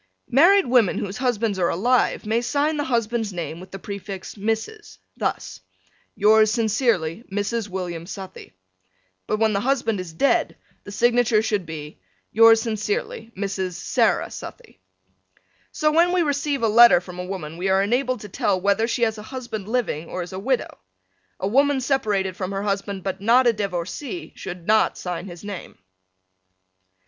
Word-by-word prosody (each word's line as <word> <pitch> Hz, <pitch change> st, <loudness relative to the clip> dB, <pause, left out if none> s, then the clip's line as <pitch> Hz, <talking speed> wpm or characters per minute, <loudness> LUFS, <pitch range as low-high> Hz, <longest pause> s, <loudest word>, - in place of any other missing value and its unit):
Married 350 Hz, +9 st, +6 dB
women 245 Hz, -6 st, +3 dB
whose 200 Hz, 0 st, -4 dB
husbands 230 Hz, -6 st, 0 dB
are 175 Hz, -, +2 dB
alive 240 Hz, +7 st, +1 dB
may 225 Hz, +2 st, +1 dB
sign 290 Hz, +5 st, 0 dB
the 290 Hz, -, -1 dB
husband's 230 Hz, -3 st, -1 dB
name 170 Hz, -2 st, -5 dB
with 185 Hz, -, -11 dB
the 195 Hz, -, -7 dB
prefix 200 Hz, -1 st, -7 dB
Mrs: 225 Hz, -, -4 dB, 0.2 s
thus, -, -, -3 dB, 0.6 s
Yours 215 Hz, +1 st, +5 dB
sincerely, 220 Hz, -5 st, 0 dB
Mrs. 205 Hz, +2 st, -2 dB
William 175 Hz, -3 st, -5 dB
Southey. 195 Hz, -1 st, -9 dB, 0.8 s
but 215 Hz, -, 0 dB
when 220 Hz, 0 st, +2 dB
the 200 Hz, -, +1 dB
husband 235 Hz, -3 st, 0 dB
is 180 Hz, -2 st, -6 dB
dead 275 Hz, +13 st, +1 dB, 0.3 s
the 200 Hz, -, -8 dB
signature 235 Hz, 0 st, +3 dB
should 205 Hz, -6 st, -1 dB
be 150 Hz, -6 st, -8 dB, 0.3 s
Yours 225 Hz, +1 st, +7 dB
sincerely, 410 Hz, -, -3 dB
Mrs. 195 Hz, -2 st, -3 dB
Sarah -, -, +1 dB
Southey. -, -, -10 dB, 0.9 s
So 305 Hz, 0 st, +1 dB
when 340 Hz, +3 st, +4 dB
we 360 Hz, -1 st, +3 dB
receive 285 Hz, -3 st, -1 dB
a -, -, +4 dB
letter 235 Hz, -2 st, +7 dB
from 180 Hz, 0 st, -10 dB
a -, -, -3 dB
woman 175 Hz, -5 st, -6 dB
we 190 Hz, +2 st, -1 dB
are 190 Hz, +1 st, +3 dB
enabled 250 Hz, +2 st, 0 dB
to 210 Hz, -, -8 dB
tell 190 Hz, 0 st, 0 dB
whether 200 Hz, +4 st, +1 dB
she 240 Hz, 0 st, -1 dB
has 220 Hz, -1 st, 0 dB
a 210 Hz, -, -10 dB
husband 235 Hz, -6 st, -6 dB
living 215 Hz, -10 st, -2 dB
or 180 Hz, -, -3 dB
is 175 Hz, -, -10 dB
a 185 Hz, -, -4 dB
widow. 255 Hz, +5 st, -2 dB, 0.6 s
A 190 Hz, -, -1 dB
woman 275 Hz, +5 st, +3 dB
separated 210 Hz, -8 st, 0 dB
from 190 Hz, 0 st, -4 dB
her 195 Hz, +1 st, -3 dB
husband 200 Hz, -1 st, -2 dB
but 190 Hz, 0 st, -4 dB
not 240 Hz, +5 st, +4 dB
a 240 Hz, -, +4 dB
divorcee 205 Hz, -, -4 dB
should 175 Hz, -2 st, -8 dB
not 215 Hz, +2 st, +3 dB
sign 180 Hz, 0 st, -5 dB
his 175 Hz, 0 st, -10 dB
name. 205 Hz, -3 st, -8 dB
215 Hz, 165 wpm, -23 LUFS, 190-245 Hz, 0.9 s, Yours